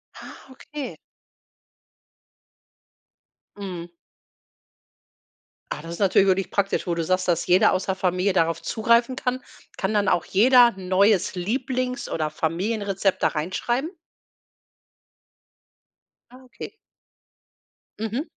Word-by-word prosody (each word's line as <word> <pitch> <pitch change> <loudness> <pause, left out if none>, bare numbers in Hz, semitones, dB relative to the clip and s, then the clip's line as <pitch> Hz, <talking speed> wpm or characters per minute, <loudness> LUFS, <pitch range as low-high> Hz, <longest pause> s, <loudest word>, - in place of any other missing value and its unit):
Ah, - - -12
okay. 285 +1 -8 2.6
Mhm. 180 -4 -6 1.8
Ah, - - -4
das 165 +2 -8
ist 170 - -8
natürlich 195 0 +4
wirklich 190 0 +1
praktisch, 200 -1 0
wo 175 - 0
du 170 - -1
sagst, 185 +2 0
dass 175 -1 0
jeder 180 +1 +5
aus 185 - -1
der 190 - -1
Familie 185 +1 0
darauf 165 -2 +1
zugreifen 235 +3 +2
kann. 255 0 -2 0.4
Kann 195 +2 -1
dann 205 -2 +1
auch 175 - +2
jeder 245 +5 +6
'n 185 -1 -8
neues 195 +1 +3
Lieblings 250 +5 -2
oder 155 -1 -2
Familienrezept 195 +4 -1
da - - +4
reinschreiben? 240 - -2 2.4
Ah, 255 +1 -16
okay. 255 - -10 1.3
Mhm. 225 +6 -2
195 Hz, 110 wpm, -24 LUFS, 180-240 Hz, 2.6 s, jeder